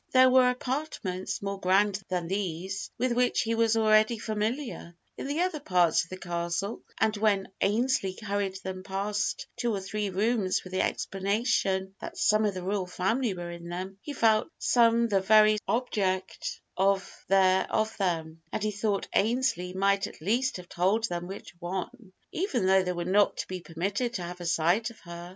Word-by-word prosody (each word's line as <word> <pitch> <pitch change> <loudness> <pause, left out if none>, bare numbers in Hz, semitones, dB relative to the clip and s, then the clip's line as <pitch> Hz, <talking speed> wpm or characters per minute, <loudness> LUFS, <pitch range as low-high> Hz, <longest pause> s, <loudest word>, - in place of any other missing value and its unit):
There 255 0 +7
were 255 -1 +6
apartments 250 -9 -3
more 200 0 -3
grand 195 +2 +2
than 180 -2 -1
these, 190 0 -3
with 255 0 0
which 245 +1 +2
he 230 - -1
was 225 0 +2
already 215 +1 +4
familiar, 220 - -3 0.2
in - - -5
the 295 +4 -1
other 360 -4 0
part 180 - +3
of 170 - -9
the 185 - -6
Castle; 175 +3 -3 0.2
and 220 0 +2
when 205 -2 +1
Ainslee 210 -3 +1
hurried 200 -3 -2
them 185 0 -5
past 200 +2 -2
two 240 - 0
or - - -2
three 205 +2 -3
rooms 200 0 +1
with 185 - -11
the 185 - +2
explanation 195 -1 0
that 340 +1 -7
some 215 -10 +3
of 205 -2 0
the 185 - -5
royal 190 0 -1
family 210 +5 0
were 175 -1 -6
in 170 0 -8
them, 185 +3 -6
he 290 - -6
felt 225 -2 +3
some 235 -1 +4
the 200 -3 +2
very 215 +1 +5
object 200 -6 -1 0.2
of 195 +1 +2 0.2
their 190 -1 +3
of 220 0 0
them, 165 -4 -2
and 215 - -2
he 215 - +1
thought 205 -1 -1
Ainslee 215 -5 +1
might 195 +1 +2
at - - -13
least 230 +10 0
have 180 -1 -10
told 190 +7 +1
them 175 0 -4
which 190 -4 -9
one, 190 +5 -5 0.2
even 290 - -1
though 190 0 +5
they 180 -1 -1
were 175 -1 -3
not 200 +3 +3
to - - -4
be 185 -1 -5
permitted 200 +9 -2
to 180 - -3
have 175 +1 -7
a 175 - -4
sight 175 +7 +2
of 230 - -15
her. 170 0 -9
200 Hz, 185 wpm, -28 LUFS, 185-225 Hz, 0.2 s, There